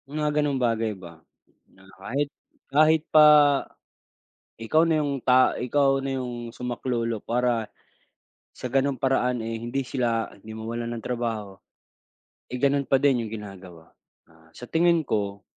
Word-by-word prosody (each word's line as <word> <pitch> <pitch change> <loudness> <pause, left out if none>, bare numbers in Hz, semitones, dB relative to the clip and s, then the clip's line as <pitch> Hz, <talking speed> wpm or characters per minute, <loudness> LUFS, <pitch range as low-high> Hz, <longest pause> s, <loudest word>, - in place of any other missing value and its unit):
Mga 150 +1 -1
gano'ng 145 -2 0
bagay 115 -4 0
ba. 85 -3 -13 0.5
Na 95 - -21 0.2
kahit 140 +8 -2 0.4
kahit 155 +1 +4
pa, 155 -1 +8 1.3
ikaw 155 +9 +2
na 160 -2 +2
yung 140 -2 -2
ta 130 0 +3
ikaw 135 +2 +2
na 135 0 -3
yung 120 -2 -6
sumaklolo 120 -2 -3
para, 120 0 -1 0.9
sa 125 - -6
gano'ng 135 +1 0
paraan 125 -2 +1
eh, 115 0 -4
hindi 120 +4 -3
sila, 120 -3 -1
hindi 110 +2 -11
mawalan 115 +2 -5
ng 115 - -6
trabaho, 115 -5 -4 0.9
eh, 125 - -4
gano'n 140 +1 +1
pa 135 - +5
din 130 -4 +1
yung - - -11
ginagawa. 95 -5 -12 0.3
Ah, 80 0 -24
sa 125 - -9
tingin 170 +3 +2
ko, 100 -3 -2
120 Hz, 140 wpm, -25 LUFS, 110-135 Hz, 1.3 s, pa